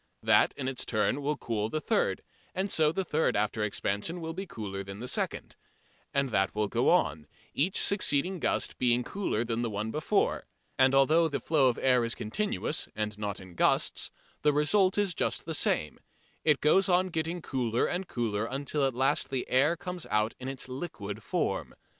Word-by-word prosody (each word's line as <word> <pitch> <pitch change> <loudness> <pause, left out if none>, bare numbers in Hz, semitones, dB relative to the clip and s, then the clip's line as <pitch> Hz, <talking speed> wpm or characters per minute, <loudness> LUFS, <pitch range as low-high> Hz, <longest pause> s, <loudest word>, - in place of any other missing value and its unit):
That - - +4
in 130 - -3
its 135 -1 -2
turn 110 +5 0
will 145 +1 -1
cool 110 -2 -2
the 155 - -1
third, - - 0 0.3
and 190 +1 -1
so 155 -1 +4
the 190 +4 -1
third 160 -2 +1
after 105 +1 0
expansion 105 - -2
will 165 -1 -5
be 190 +3 -5
cooler 100 - -5
than 100 +1 -8
the 125 - -5
second. - - -2 0.6
And 140 -1 +1
that 95 -3 +1
will 105 0 +1
go - - +1
on, 75 +1 +2 0.3
each 175 +7 +1
succeeding 185 -2 +1
gust - - -1
being 125 0 +3
cooler 155 - -2
than 115 0 -1
the 120 - -1
one 105 +1 -3
before. 155 +3 0 0.3
And 130 0 +4
although 155 +5 +5
the 145 -3 -2
flow 150 -5 +3
of 120 - -2
air 125 -2 +3
is 115 0 -2
continuous, 205 - -1
and 105 -1 -2
not 105 -1 -3
in 95 -2 -12
gusts, - - +1 0.3
the 150 0 +3
result 185 +7 +3
is 205 -3 +1
just - - -1
the 165 - -3
same: 75 - 0 0.4
it 150 -3 +3
goes 190 +6 +4
on 185 +1 +3
getting 165 +1 -2
cooler 125 -7 0
and 180 +1 -2
cooler 115 -5 -2
until 140 +2 -1
at 130 - -4
last 135 +2 +1
the 130 -2 -2
air 145 +7 +3
comes 180 0 -5
out 105 +1 +1
in 130 - -6
its 135 -1 -5
liquid 115 - -6
form. - - -2
135 Hz, 190 wpm, -29 LUFS, 110-160 Hz, 0.6 s, although